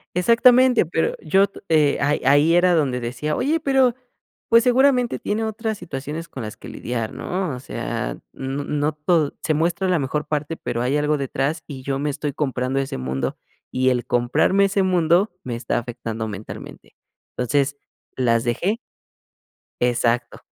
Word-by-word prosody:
Exactamente, 245 +3 +5
pero 165 0 0
yo 190 +5 +3
t - - -13
eh, 150 -3 +3
ahí 145 +2 +1
ahí 145 +5 +5
era 175 0 +4
donde 135 -6 +1
decía: 125 +6 -3
"Oye, 300 +6 +1
pero, 265 -4 +3 0.5
pues, 230 +1 +5
seguramente 250 -1 +3
tiene 220 +2 -2
otras 220 0 -3
situaciones 150 0 -6
con 130 - -7
las 110 -1 -6
que - - -11
lidiar, 115 -2 -4
¿no?", 180 -5 -3
o 125 - -7
sea, - - -4 0.2
n 135 +2 -4
no 150 +1 0
todo 150 0 +1
se 155 - +1
muestra 170 +5 0
la 180 -2 +3
mejor 150 +1 -2
parte, 150 +1 -2
pero 115 - -3
hay 130 +4 +1
algo 150 0 +1
detrás. 140 +3 -2
Y 135 -3 -8
yo 135 0 -2
me 145 +1 -1
estoy 145 0 -3
comprando 130 -2 -1
ese 135 - -3
mundo, 65 +1 -3 0.3
y 130 0 +2
el 125 -1 -1
comprarme 125 +11 +2
ese 195 0 +2
mundo 180 +1 +3
me 120 -2 -3
está 120 - -1
afectando 115 -2 -5
mentalmente, 105 0 -9 0.4
entonces, 140 +3 0 0.4
las 115 -3 +2
dejé 175 - 0 1.0
exacto, 120 -1 +1
150 Hz, 165 wpm, -22 LUFS, 125-185 Hz, 1.0 s, Exactamente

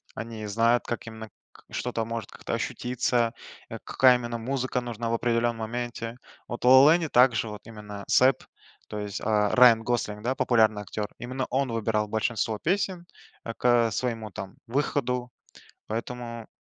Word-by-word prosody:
они 115 -1 -6
знают, 115 +3 +2
как 120 - -4
именно 110 -1 -8 0.2
к - - -19
что-то 115 -2 -2
может 115 -2 -5
как-то - - -6
ощутиться, 120 -1 -1 0.4
э, - - -6
какая 130 -1 +5
именно 120 -1 -4
музыка 130 +1 -2
нужна 120 -1 -4
в - - 0
определенном 115 0 +1
моменте. 115 +1 -4 0.3
Вот 120 - -6
в - - +4
"Ла-Ла 130 +4 +8
Ленде" 165 -3 -1
также 120 -3 +4
вот 105 -1 -8
именно 105 -2 -9
Сэб, 130 0 +5 0.5
то 105 - -6
есть, 105 -1 -4
а, 105 -1 +2
Райан 120 -3 +7
Гослинг, 105 -3 -2
да, 125 +2 +1
популярный 110 -5 +2
актер, 105 +1 -4
именно 130 +2 -3
он 130 -1 0
выбирал 110 -1 0
большинство 110 0 -1
песен, 180 - -1 0.4
э, 115 - -4
к, 120 +1 +3
своему 115 -2 -3
там 95 -1 -8
выходу, 125 -1 -1 0.6
поэтому 115 0 -5
115 Hz, 160 wpm, -27 LUFS, 110-125 Hz, 0.6 s, Ла-Ла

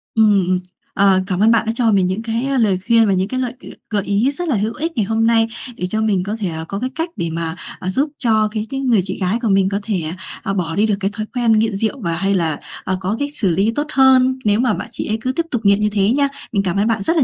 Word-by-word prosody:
Ừm, 210 -4 +4
ừ, 185 - +2 0.4
ờ, 195 -1 +4
cảm 185 -2 -1
ơn 220 +3 +5
bạn 230 -1 +2
đã 225 - 0
cho 235 -2 +3
mình 190 -3 +3
những 190 +4 -2
cái, 230 +3 -2
ơ, 275 -1 0
lời 200 -6 +2
khuyên 230 -2 +5
và 195 - +2
những 190 +1 0
cái 255 +4 -3
lợi 250 -2 -2
g - - -13 0.2
gợi 205 -3 0
ý 205 +8 +1
rất 350 +4 -4
là 275 - +1
hữu 215 +3 -1
ích 325 +3 -3
ngày 215 -4 +1
hôm 225 +1 +1
nay 225 -1 +3 0.3
để 180 - -3
cho 220 +3 -1
mình 200 -4 +1
có 205 +3 -3
thể, 195 -5 -2
ờ, 160 0 -5
có 195 - -4
cái 255 - -2
cách 330 +2 -2
để 170 - -2
mà, 165 0 -3 0.2
à, 185 - -3
giúp 275 +10 +1
cho 220 -3 +2
cái 215 0 -3
tính 270 -1 -3
người 225 -5 +4
chị 190 +1 -3
gái 185 +6 0
của 225 - 0
mình 195 -1 +3
có 200 0 -1
thể, 200 -5 -1 0.4
ờ, 195 - -2
bỏ 170 -4 -2
đi 210 +3 +3
được 210 -2 +1
cái 195 +1 -1
thói 215 0 -4
quen 240 -2 +2
nghiện 220 -1 +2
rượu, 220 +6 -1
và 170 -4 -1
hay 195 +4 0
là, 165 -5 0 0.2
ờ, 185 0 -1
có 190 +3 -2
cách 285 0 -1
xử 200 -10 0
lý 195 +6 +2
tốt 295 +1 -1
hơn 260 -1 +4
nếu 205 +2 +3
mà 250 - +2
bạn - - -4
chị - - -1
ấy 215 +1 0
cứ 255 - -1
tiếp 335 +5 -2
tục 240 -4 -1
nghiện 200 +1 +5
như 210 - +1
thế 200 0 +2
nha. 280 - +3 0.2
Mình 200 -4 +1
cảm 185 -1 -1
ơn 205 +3 +2
bạn 220 -3 0
rất 330 - +1
là 285 - +5
215 Hz, 305 wpm, -18 LUFS, 195-235 Hz, 0.4 s, ơn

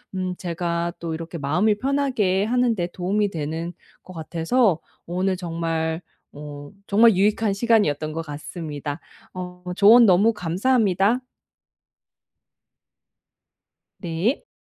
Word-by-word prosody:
음 185 -1 -2
제가 170 -1 -2
또 165 -1 -4
이렇게 165 +1 -6
마음을 180 +9 +1
편하게 255 -7 +1
하는 245 +1 +2
데 175 -3 -2
도움이 200 +3 0
되는 165 +2 -4 0.3
것 185 - -12
같아서 170 +4 +1 0.3
오늘 185 +2 -1
정말 165 -2 -2 0.3
어 145 0 -9
정말 220 +1 +5
유익한 210 +2 +2
시간이었던 195 -9 +1
것 165 +1 -4
같습니다. 150 0 -6 0.3
어 180 -1 -7
조언 225 +5 +7
너무 200 +3 +5
감사합니다. 205 +2 +1 2.8
네. 190 - -1
180 Hz, 230 characters per minute, -23 LUFS, 165-210 Hz, 2.8 s, 조언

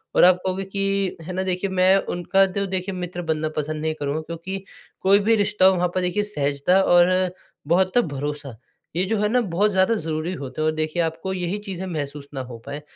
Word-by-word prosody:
और - - +6
आप 180 0 +7
कहोगे 190 +1 -1
कि, 195 0 -1
है 175 +3 -6
ना 190 +1 -1
देखिए 185 +1 -1
मैं 185 0 +4 0.2
उनका 190 +3 +3
तो 200 +1 -2
देखिए 185 0 -2
मित्र 180 -1 -4
बनना 160 -2 -1
पसंद 155 0 -2
नहीं 160 0 0
करूँगा 145 +2 -2
क्योंकि 170 +4 -6 0.4
कोई 195 +1 +5
भी 225 - +6
रिश्ता 205 -2 +2
हो 190 0 +6
वहाँ 180 0 +1
पर 185 - +1
देखिए 180 +3 0
सहजता 150 -1 +1
और 180 0 +4 0.4
बहुत 185 +5 +2
भरोसा, 145 - -2 0.4
ये 180 - +2
जो 220 +3 0
है 210 - +2
ना 250 +3 +3
बहुत 205 0 +1
ज़्यादा 190 +3 +3
ज़रूरी 160 -1 -3
होता 140 -3 -6
है। - - +1
और - - +3
देखिए 155 +2 -1
आपको 165 +4 -3
यही 180 +1 -2
चीज़ें 190 -1 -4
महसूस 145 -4 -5
ना 135 - -3
हो 125 -2 -8
पाएँ, 145 +1 -5
180 Hz, 215 wpm, -23 LUFS, 155-190 Hz, 0.4 s, आप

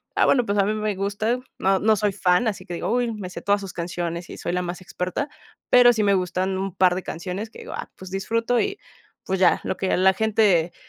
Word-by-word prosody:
ah, - - +4
bueno, 245 -3 +3
pues 200 -1 -1
a 195 - +4
mí 210 - 0
me 215 -1 -1
gusta. 205 +5 -1 0.2
No, 195 0 +2
no 220 +1 +4
soy 210 0 +1
fan, 180 +5 +2
así 195 -4 -3
que 175 - -7
digo: 170 - -2
"Uy 245 -1 +1
me 200 -4 -6
sé - - -7
todas 205 0 +1
sus 195 -2 -7
canciones 170 0 -4
y - - -8
soy - - -3
la 180 +1 0
más 180 +1 -5
experta", 185 - -3 0.4
pero 245 -1 +7
sí 220 -2 0
me 200 -1 +4
gustan 185 0 0
un 195 -2 -4
par 185 -1 +4
de 185 - -3
canciones 185 +6 -5
que - - -13
digo: - - -8
"Ah, - - -6
pues 185 0 -11
disfruto 230 +5 0
y 405 0 -2 0.5
pues, 190 0 -1
ya", 185 -2 +4
lo 190 - -3
que 190 - 0
la 190 +1 +5
gente 200 -5 +2
195 Hz, 250 wpm, -23 LUFS, 180-215 Hz, 0.5 s, pero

